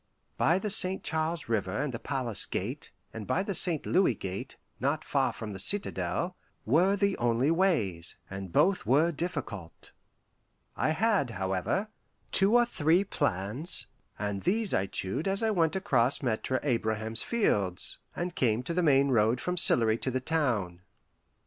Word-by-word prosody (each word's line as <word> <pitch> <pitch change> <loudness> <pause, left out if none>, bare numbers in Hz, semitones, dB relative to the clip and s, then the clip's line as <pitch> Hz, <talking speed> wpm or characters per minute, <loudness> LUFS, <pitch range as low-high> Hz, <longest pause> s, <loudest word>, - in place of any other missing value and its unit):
By 170 - +3
the 205 +2 -1
St. 190 -1 +3
Charles 160 0 -2
River 105 -5 -1
and 140 -1 -2
the 115 - -4
Palace 120 -6 -1
Gate, 125 +10 -4 0.2
and 110 -2 -7
by 165 +9 +1
the 200 - -3
St. 170 -3 +1
Louis 185 - +2
Gate, 95 -1 -6 0.2
not - - -1
far - - +1
from 105 -2 -7
the 95 - -7
citadel, 175 - -1 0.3
were 175 - +3
the 200 -1 +1
only 120 +5 +2
ways, 115 - 0
and 95 -2 -7
both 190 - +3
were 145 +9 +3
difficult. 140 - -6 0.8
I - - 0
had, 195 - +1
however, 95 - -2 0.4
two 195 +4 +3
or 240 0 +6
three 170 -4 +2
plans, 120 - 0 0.3
and 100 -2 -3
these 210 +2 +2
I 95 - +1
chewed 95 - -2
as 195 +3 0
I 220 - +2
went 165 -5 +1
across 140 -10 +1
Maitre 130 +2 -1
Abraham's 110 -4 -1
fields, 100 - 0 0.2
and 175 0 -3
came 120 -4 +1
to 170 - -3
the 180 - +1
main 140 -4 +4
road 115 0 +2
from 180 +6 -2
Sillery 115 -9 +4
to - - -2
the 130 0 -1
town. 125 - -1
135 Hz, 160 wpm, -29 LUFS, 110-180 Hz, 0.8 s, or